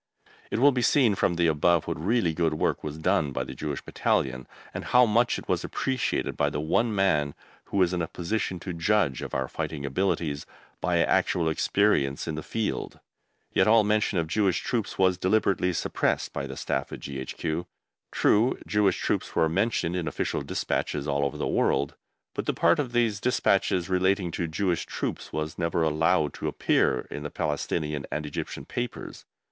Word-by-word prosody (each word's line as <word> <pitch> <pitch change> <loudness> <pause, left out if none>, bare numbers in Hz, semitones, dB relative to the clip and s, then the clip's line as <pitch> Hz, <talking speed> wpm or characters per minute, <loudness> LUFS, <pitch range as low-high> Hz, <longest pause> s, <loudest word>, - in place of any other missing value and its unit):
It - - -1
will 140 +4 +6
be 125 -2 -1
seen 120 -3 +4
from 90 -2 +1
the 85 0 +2
above 80 +1 +3
what 80 - -4
really 100 -4 +2
good 80 -1 +1
work - - 0
was 75 0 -5
done 75 -2 +1
by - - -2
the - - -7
Jewish 75 -3 -4
Battalion, 65 -1 -1 0.3
and - - -5
how 125 0 +5
much 120 +2 +2
it - - -9
was - - 0
appreciated 130 -2 -1
by 75 - +1
the 75 - -3
one 105 +9 +1
man 75 -8 +2 0.3
who - - -4
was 90 -2 +3
in 90 - 0
a 80 - -1
position 90 +1 -2
to 90 - -5
judge 85 -4 +1
of - - -5
our 65 -1 0
fighting 70 +1 -4
abilities 75 -1 -1 0.3
by - - +1
actual 85 -2 +2
experience 80 -4 +1
in 80 - -2
the 80 - -4
field. 110 +6 -3 0.5
Yet - - +4
all 110 0 +6
mention 105 -1 +1
of 85 - +1
Jewish 95 +2 +1
Troops 115 -5 -2
was 95 -1 +3
deliberately 95 -2 +2
suppressed 85 - -1
by - - -3
the - - -8
Staff 65 -1 -2
at - - -6
G.H.Q. 75 +5 -4 0.4
True, 115 +5 +3
Jewish 105 -2 +2
Troops - - -2
were 80 - +4
mentioned 95 0 0
in 90 -3 -2
official 75 - -2
despatches 75 0 -2
all 70 0 +1
over 70 - -2
the - - -2
world, 70 +1 +1 0.4
but - - -4
the - - 0
part 85 - +3
of 130 -5 -2
these 115 -4 +2
despatches 100 -7 +2
relating 95 -1 +1
to 85 +1 -2
Jewish 85 +1 -1
Troops - - -4
was 75 +2 -4
never 85 0 +1
allowed 80 0 +2
to - - -4
appear - - +2
in 75 - -5
the 75 - -4
Palestinian 75 0 -2
and 75 0 -2
Egyptian 70 -1 -5
papers. 120 -1 -5
85 Hz, 185 wpm, -27 LUFS, 75-105 Hz, 0.5 s, will